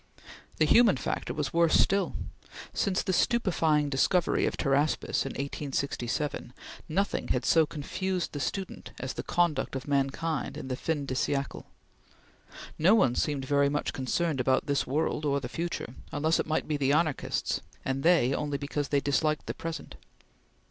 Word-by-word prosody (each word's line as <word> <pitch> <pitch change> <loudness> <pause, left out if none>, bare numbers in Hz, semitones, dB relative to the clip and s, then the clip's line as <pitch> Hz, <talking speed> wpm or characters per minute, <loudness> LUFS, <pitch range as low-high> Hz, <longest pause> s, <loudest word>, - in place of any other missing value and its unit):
The 155 - +4
human 220 - +5
factor 125 - -3
was 145 +1 -3
worse 170 -1 +4
still. 195 0 +2 0.6
Since 195 -2 0
the 185 - -1
stupefying 165 -10 +2
discovery 155 +6 +2
of - - -3
Pteraspis 140 0 +1
in - - -5
1867, 140 -2 -3 0.4
nothing 200 +6 0
had - - 0
so 160 -2 +4
confused 180 +4 -3
the 145 - -5
student 185 +9 -4
as 135 - -4
the - - -4
conduct 175 -5 0
of 135 +1 -5
mankind 140 +3 -1
in 130 - -6
the 130 - -1
fin 150 +1 -2
de 130 - -3
siecle. 135 +1 -2 1.1
No 185 +8 +6
one 130 - +4
seemed 140 0 -1
very 140 +1 +3
much 145 +1 -1
concerned 140 +3 -1
about 130 +1 +2
this 140 -1 0
world 150 +2 0
or 140 -1 +1
the 130 - -5
future, 165 -3 -4 0.2
unless 155 +3 +1
it - - -1
might 155 - 0
be 150 - 0
the 140 0 +2
anarchists, 155 -2 0 0.2
and 135 0 -1
they 160 -6 +4
only 145 0 -1
because 140 +1 -3
they 140 -1 +1
disliked 150 +2 +1
the - - -3
present. 165 -2 -6
145 Hz, 160 wpm, -29 LUFS, 135-165 Hz, 1.1 s, No